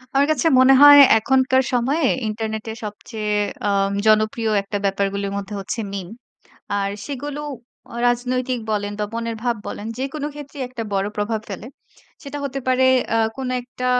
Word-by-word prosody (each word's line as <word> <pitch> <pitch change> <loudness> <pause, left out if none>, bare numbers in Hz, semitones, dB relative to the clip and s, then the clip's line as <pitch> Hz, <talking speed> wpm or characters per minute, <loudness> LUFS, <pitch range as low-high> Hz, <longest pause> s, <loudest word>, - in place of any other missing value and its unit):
আমার 280 +1 +4
কাছে 310 0 +1
মনে 260 +1 +7
হয় 290 0 +10 0.2
এখনকার 260 +2 +2
সময়ে 265 +7 +1 0.2
ইন্টারনেটে 220 0 -4
সবচেয়ে 210 0 -4 0.3
আম 195 0 +1 0.2
জনপ্রিয় 215 +1 +2
একটা 200 +1 -3
ব্যাপারগুলির 200 0 -1
মধ্যে 200 +1 -6
হচ্ছে 195 +4 -4
মিম। 190 -3 -5 0.7
আর 200 -1 0 0.2
সেগুলো 290 +1 -5 0.5
আ - - -8
রাজনৈতিক 250 +1 0
বলেন, 205 -1 -1
বা 210 - 0
মনের 230 0 -3
ভাব 240 -1 +1
বলেন 210 - -6
যেকোন 275 +3 -4
ক্ষেত্রেই 285 -2 -7
একটা 240 -3 -5
বড় 195 0 0
প্রভাব 215 +2 -1
ফেলে। 195 +3 -6 0.6
সেটা 285 0 -6
হতে 275 0 -4
পারে 255 0 +3 0.3
অ্যা 225 - +1 0.2
কোনো 260 -1 -3
একটা 250 +1 -7
235 Hz, 155 wpm, -21 LUFS, 210-260 Hz, 0.7 s, হয়